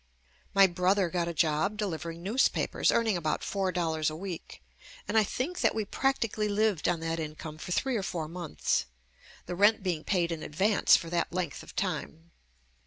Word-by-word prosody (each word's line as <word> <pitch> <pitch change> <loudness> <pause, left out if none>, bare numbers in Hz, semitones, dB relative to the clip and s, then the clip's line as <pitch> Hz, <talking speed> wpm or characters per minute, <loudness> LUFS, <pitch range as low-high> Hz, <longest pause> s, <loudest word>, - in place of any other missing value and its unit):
My 195 0 +8
brother 185 0 +2
got 175 -1 0
a - - -1
job 165 +5 +1
delivering 170 -4 -4
newspapers, 225 +8 +2
earning 225 -3 +2
about 155 -3 -1
four 195 -3 -1
dollars 160 -3 0
a 155 - -6
week, 180 0 -7 0.4
and - - -2
I 220 - +6
think 275 - -3
that - - +3
we 220 -2 -1
prac 270 +6 0
tically 215 -2 -1
lived 205 -4 +1
on 170 -2 0
that 165 0 -2
income 155 0 -6
for 180 - -7
three 260 +7 +1
or - - -1
four 165 -4 -3
months, 165 - -1 0.6
the - - -5
rent 205 +3 +4
being 170 -5 -1
paid 175 -3 +1
in 165 -2 -4
advance 195 +9 +3
for 165 -2 -7
that 175 - 0
length 170 -5 -3
of - - -13
time. 165 +2 -3
180 Hz, 185 wpm, -29 LUFS, 165-205 Hz, 0.6 s, My